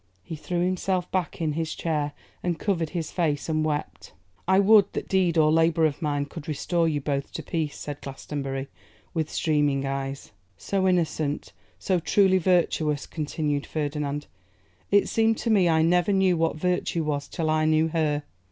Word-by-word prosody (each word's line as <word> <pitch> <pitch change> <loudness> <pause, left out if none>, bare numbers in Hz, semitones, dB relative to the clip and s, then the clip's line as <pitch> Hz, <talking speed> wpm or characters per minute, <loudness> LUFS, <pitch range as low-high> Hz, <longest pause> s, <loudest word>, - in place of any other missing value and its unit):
He 165 - -6
threw 175 +3 -2
himself 185 0 -1
back 185 -2 -2
in 155 -2 0
his 160 +1 -3
chair, 150 -3 -1 0.3
and 175 -2 -1
covered 170 -6 -1
his 165 -3 -4
face 155 -5 -1
and 155 -1 0
wept. 155 -1 -4 0.3
'I 190 +1 +5
would 205 0 +5
that - - -4
deed 180 -3 +2
or 155 -1 +5
labour 165 0 +3
of 150 +1 -1
mine 145 -2 0
could 145 +1 -10
restore 165 +2 0
you 150 -2 -1
both 140 -1 -2
to - - -5
peace,' 155 -3 -3
said 145 -1 -6
Glastonbury, 135 0 -5 0.5
with 160 -3 -1
streaming 145 -3 +1
eyes. 135 -1 -4 0.3
'So 190 -1 0
innocent, 160 -5 0 0.2
so 185 -2 0
truly 190 +2 +3
virtuous!' 160 -4 +1
continued 150 -2 -2
Ferdinand. 145 -1 -3 0.6
'It 200 0 +4
seemed 225 0 +2
to 230 - -1
me 190 -5 +4
I 160 -1 +3
never 175 +3 +3
knew 190 -2 +3
what 165 -1 +1
virtue 180 0 -1
was 145 -2 -2
till 160 -3 -2
I 155 0 +2
knew 155 +1 +3
her. 150 -2 0
160 Hz, 170 wpm, -26 LUFS, 150-180 Hz, 0.6 s, I